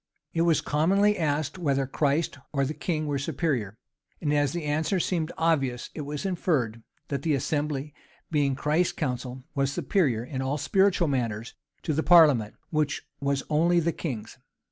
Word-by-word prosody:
It 165 - +1
was 165 -2 +3
commonly 195 +8 +3
asked 150 -1 -1
whether 140 -5 +1
Christ 145 +2 0
or 140 -1 +1
the 145 - -3
king 155 -1 -2
were 145 -2 -1
superior; 130 - -2 0.4
and 150 -2 0
as 145 -1 +2
the 175 -1 -3
answer 155 +6 0
seemed 170 -2 -1
obvious, 135 -7 0
it 155 - -5
was 150 +5 -5
inferred, 145 - 0 0.3
that 140 -2 -2
the 155 -1 +1
assembly, 145 +1 -2 0.4
being 145 -3 +2
Christ's 155 +6 +1
council, 130 -2 -4
was 135 -1 0
superior 140 - +1
in 130 +1 -4
all 135 +2 -1
spiritual 185 +4 +2
matters 115 -5 -2 0.3
to 155 - 0
the 155 - +1
parliament, 150 -12 +5 0.2
which 150 -2 0 0.2
was 140 -1 0
only 170 +3 +3
the 170 0 0
king's. 125 -10 -5
150 Hz, 165 wpm, -27 LUFS, 135-165 Hz, 0.4 s, parliament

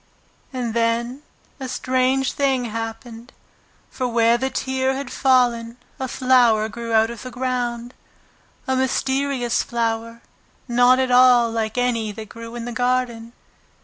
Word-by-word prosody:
And 245 -4 -3
then 235 +3 -1 0.4
a 265 - -5
strange 260 +1 0
thing 270 -3 0
happened. 230 +1 -7 0.6
For 255 - -2
where 230 -1 +3
the 265 +2 -1
tear 265 0 -1
had 275 -1 -5
fallen 240 -3 +2 0.2
a 260 - -2
flower 245 -4 +3
grew 235 +1 -6
out 225 +1 +3
of 235 - -9
the 255 - -7
ground, 245 -1 -3 0.7
a 260 - +1
mysterious 265 -1 0
flower, 230 0 -3 0.4
not 245 +1 +4
at 260 -1 0
all 245 -2 +5
like 220 0 -3
any 235 -3 0
that 215 -1 -9
grew 230 0 -9
in 235 -1 -5
the 245 - -5
garden. 240 -1 -1
245 Hz, 140 wpm, -21 LUFS, 230-255 Hz, 0.7 s, all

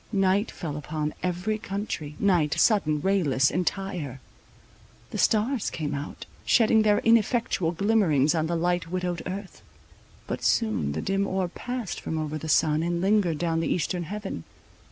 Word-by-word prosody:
Night 195 +1 +2
fell 150 -4 -5
upon 150 0 -3
every 180 +4 -1
country, 195 -8 -4
night, 175 -7 +2
sudden, 155 -9 +3
rayless, 145 -9 +2
entire. 180 -7 -2 0.9
The - - -4
stars 230 +2 +2
came 150 -2 -3
out, 140 +1 -6 0.2
shedding 220 -1 +4
their 210 -1 +3
ineffectual 230 -6 +2
glimmerings 170 -7 +3
on 160 -1 0
the 170 - -1
light 175 +1 0
widowed 180 -1 -2
earth. 190 +1 -7 0.6
But - - -4
soon 215 - +1
the 80 - -3
dim 195 +1 0
orb 185 -2 -2
passed 245 -5 -4
from 160 - -3
over 155 0 -3
the 160 - -6
sun, 155 +1 +3
and 170 +1 -1
lingered 190 -4 +2
down 165 0 0
the 165 - -1
eastern 175 0 -1
heaven. 200 - -5
180 Hz, 155 wpm, -26 LUFS, 155-205 Hz, 0.9 s, shedding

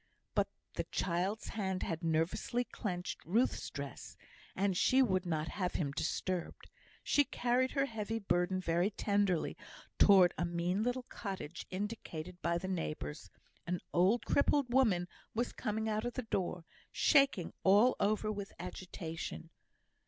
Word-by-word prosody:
But - - +2 0.3
the - - -2
child's 185 +5 -1
hand 190 -4 -2
had 165 0 -3
nervously 165 +9 0
clenched 180 -7 -4
Ruth's 225 +9 +1
dress, 140 -1 -7 0.4
and 195 -1 +1
she 260 +8 +5
would 185 -6 +1
not 160 -2 -1
have 180 -3 -2
him 145 -5 0
disturbed. 170 +4 -3 0.3
She 290 - +4
carried 250 0 +1
her 275 -1 +2
heavy 225 -3 -3
burden 185 -3 +1
very 175 +1 +1
tenderly 200 -4 +1 0.4
towards 190 -3 +7
a - - +2
mean 175 +3 0
little 245 +2 0
cottage 190 -9 -6
indicated 185 -4 -5
by 170 +1 +1
the 185 +2 -4
neighbours; 155 - -4 0.4
an 180 0 -1
old 190 +7 +3
crippled 280 -3 +2
woman 205 -10 +3 0.3
was 240 +2 -1
coming 220 +1 -2
out 215 0 0
of 245 - -2
the 255 - -2
door, 180 -5 -2 0.3
shaking 275 - +3
all 205 +6 +6
over 215 +1 +1
with 200 -1 -5
agitation. 170 -2 -6
190 Hz, 140 wpm, -34 LUFS, 175-220 Hz, 0.4 s, towards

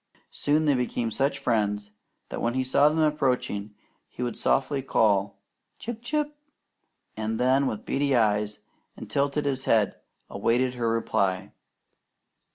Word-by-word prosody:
Soon 150 +2 +1
they 145 - +4
became 120 -2 -1
such 135 +5 0
friends 105 -3 0 0.4
that - - -5
when 120 +1 0
he 130 - +1
saw 140 +3 +4
them 155 - -2
approaching 130 -9 0 0.3
he 125 - -6
would 120 -2 -1
call - - -10
softly 135 0 +1 0.9
"Chip! 230 0 -6
Chip!" 295 +4 -1 0.8
and 110 0 -2
then 130 +2 +3
with 105 - -4
beady 140 0 +1
eyes 105 -2 +2 0.4
and - - -9
tilted 140 +1 0 0.2
head 110 -3 +2 0.3
await 125 +2 +1
her 120 -2 -1
reply. 100 -4 0
125 Hz, 135 wpm, -26 LUFS, 110-145 Hz, 0.9 s, they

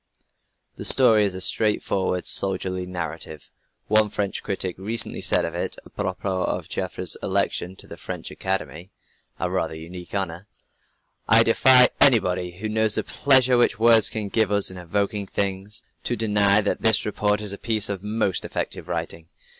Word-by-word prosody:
The - - -7
story 110 -5 +5
is 95 -2 -2
a 95 - -5
straightforward 95 -3 0
soldierly 95 -1 -1
narrative. 80 -3 -7 0.4
One 110 0 +3
French 100 -1 -4
critic 95 -2 -3
recently 110 +3 0
said - - +2
of - - -5
it, - - -4
apropos 95 -2 -4
of - - -4
Joffre's - - -2
election 90 +2 -1
to - - -13
the - - -11
French - - -7
Academy, 95 -2 -4 0.5
a - - -2
rather 80 - -2
unique 85 +4 -9
honor: 95 0 -4 0.8
"I - - +7
defy 130 -1 +6
anybody 90 -8 +3
who 110 +3 -4
knows 110 0 +1
the - - 0
pleasure 130 -3 +3
which 120 -4 +2
words 115 0 +4
can 105 -2 -3
give 110 -1 +1
us 100 -2 +3
in 95 - -10
evoking 100 +3 -2
things, 100 +2 -3 0.2
to 120 - 0
deny 105 -2 +2
that 105 - -2
this 110 -2 +3
report 105 0 -1
is 105 -2 0
a 100 - -8
piece 110 -2 +1
of 100 -2 -4
most 105 -2 -1
effective - - -5
writing. 80 0 -6
100 Hz, 160 wpm, -23 LUFS, 95-110 Hz, 0.8 s, I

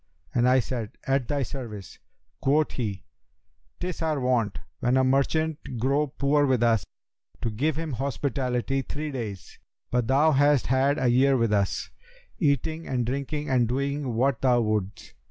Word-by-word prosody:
and 120 +1 +3
I 130 +1 +5
said, 115 -3 -4
'At 135 -2 +1
thy 145 -2 0
service.' 115 -7 -7 0.4
Quoth 150 +3 +2
he, 100 -7 -3 0.8
''Tis 180 -1 -4
our 155 -3 0
wont, 125 -5 +1 0.2
when 125 +2 +2
a 130 - +4
merchant 145 +4 +1 0.2
grow 140 +5 +1
poor 145 +1 +1
with 130 -3 +2
us, 115 -3 +3 0.6
to 115 - 0
give 140 +8 0
him 160 0 -3
hospitality 135 0 -1
three 150 +3 -5
days; 110 -8 -6 0.3
but 125 -2 +1
thou 145 +5 +4
hast 145 -1 +3
had 135 +3 +2
a 125 - +1
year 135 +2 +4
with 115 -3 +1
us, 100 -2 0 0.5
eating 160 - 0
and 125 -2 -1
drinking 140 +4 -3
and 125 -3 +2
doing 140 0 -2
what 130 0 +1
thou 125 -2 +4
wouldst.' 105 -2 -2
130 Hz, 155 wpm, -26 LUFS, 120-145 Hz, 0.8 s, I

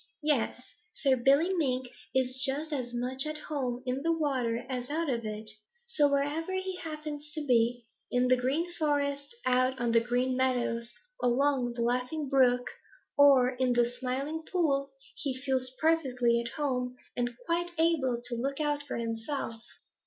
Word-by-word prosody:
Yes, 260 -4 +1 0.3
Sir, 270 -3 +3
Billy 280 +9 +4
Mink 260 -7 0 0.3
is 260 0 +2
just 295 +3 -1
as 250 -4 -2
much 255 +3 -1
at 305 0 -3
home 260 -5 -3
in 255 +1 -1
the 330 +3 +1
water 255 -7 0
as 250 -1 -4
out 315 0 0
of 230 -3 -2
it. 215 0 -4 0.3
So, 300 -11 +3
wherever 290 +6 0
he 375 -1 -3
happens 305 -2 -6
to 305 -2 -3
be, 240 -1 +2 0.2
in 250 0 +2
the 255 - +5
Green 280 +8 -1
Forest, 285 0 -1
out 255 +1 +2
on 240 -1 +1
the 230 - +6
Green 245 +2 0
Meadows, 245 -2 0 0.3
along 250 0 +2
the 235 0 -2
Laughing 250 +5 -1
Brook, 250 -2 +4 0.5
or 275 -3 +6
in 255 -1 +1
the 240 0 +3
Smiling 265 +6 -3
Pool, 280 -6 +1 0.3
he 265 -3 -3
feels 260 -1 0
perfectly 250 -7 +2
at 235 0 -6
home 255 -4 -1 0.2
and 245 -1 -2
quite 345 +1 0
able 280 -8 +2
to 245 - -4
look 275 +4 -2
out 295 -1 0
for 290 -2 -5
himself. 230 +1 -3
260 Hz, 160 wpm, -30 LUFS, 245-295 Hz, 0.5 s, the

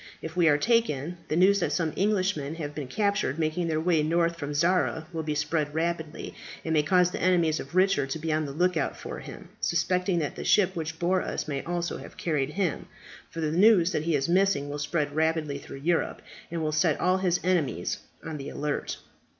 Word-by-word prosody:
If 160 +1 -7
we 175 -2 +4
are 145 -2 +5
taken, 175 - +1
the - - -1
news 195 +4 +5
that - - 0
some 160 -4 0
Englishmen 185 -7 0
have 150 -3 -5
been 145 -3 -5
captured 200 - 0
making 165 +2 0
their 155 -1 0
way 165 -1 +2
north 170 +2 +1
from 145 -3 -5
Zara 170 0 +2
will 160 -1 -2
spread 150 0 -1
rapidly, 160 -1 -2 0.3
and 160 - 0
may 155 - +4
cause 180 +3 +3
the - - -5
enemies 170 -4 +3
of 140 +6 -8
Richard 185 -7 +3
to 135 - -2
be 160 0 -2
on 155 0 0
the 140 - -5
look 180 +5 +1
out - - -1
for - - -7
him, - - -10
suspecting 180 +2 +1
that 150 -4 -2
the - - -5
ship 190 -2 +3
which 160 -1 -4
bore 180 +2 +1
us - - -3
may 140 -2 -2
also 175 0 -2
have - - -11
carried 150 -3 -1
him; 185 -7 -1 0.4
for 165 - -6
the 155 -1 0
news 185 0 +5
that 155 - -1
he 165 -2 +2
is 135 -1 0
missing 180 -5 +2
will 145 +1 -4
spread 145 -1 -1
rapidly 160 -2 0
through 135 - -9
Europe, 165 +4 -1 0.3
and 165 -1 -3
will 155 - 0
set 155 0 +2
all 185 +1 +3
his 180 -2 +1
enemies 160 - 0 0.3
on 160 -2 -4
the 135 - -6
alert." 150 -1 -3
165 Hz, 215 wpm, -27 LUFS, 150-180 Hz, 0.4 s, are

